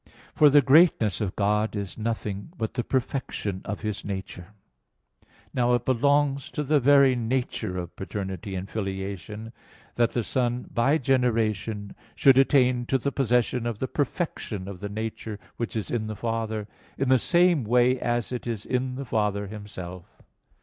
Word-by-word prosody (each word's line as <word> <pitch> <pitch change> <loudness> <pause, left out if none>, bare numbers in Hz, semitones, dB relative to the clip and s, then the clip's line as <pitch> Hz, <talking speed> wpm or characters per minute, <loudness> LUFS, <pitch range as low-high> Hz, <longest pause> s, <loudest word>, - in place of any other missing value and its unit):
For 150 - +6
the 145 0 +6
greatness 135 - +4
of 100 -3 -2
God 105 +2 +1
is 100 -2 -4
nothing 110 - -4
but 110 -4 -3
the 120 - -1
perfection 120 -7 -2
of 105 - -4
His 105 -2 -3
nature. 95 -3 -6 1.1
Now 125 -1 +3
it 120 - -2
belongs 140 +2 +2
to 150 - -1
the 150 +1 +3
very 140 0 +5
nature 120 -6 -2
of 85 -1 -6
paternity 95 0 -5
and 95 +1 -4
filiation 100 +2 -5 0.4
that 115 -1 +2
the 120 - 0
Son 125 +1 -1
by 135 +6 +3
generation 110 -6 0 0.2
should 135 -1 +6
attain 125 -3 +3
to 135 - +2
the 140 +2 -2
possession 125 -2 +1
of 115 -3 -3
the 130 - -2
perfection 130 - -3
of 100 -2 -7
the 100 +1 -5
nature 110 0 -5 0.2
which 115 - -4
is 110 - -3
in 110 -3 -1
the 110 - -4
Father, 110 -2 -3 0.3
in 135 -1 0
the 130 -1 +5
same 175 -3 +3
way 125 +3 +3
as 120 -1 -1
it 125 -1 -4
is 110 -3 -3
in 125 0 -1
the 135 +1 -5
Father 105 -3 0
Himself. 95 -4 -9
115 Hz, 165 wpm, -26 LUFS, 105-130 Hz, 1.1 s, For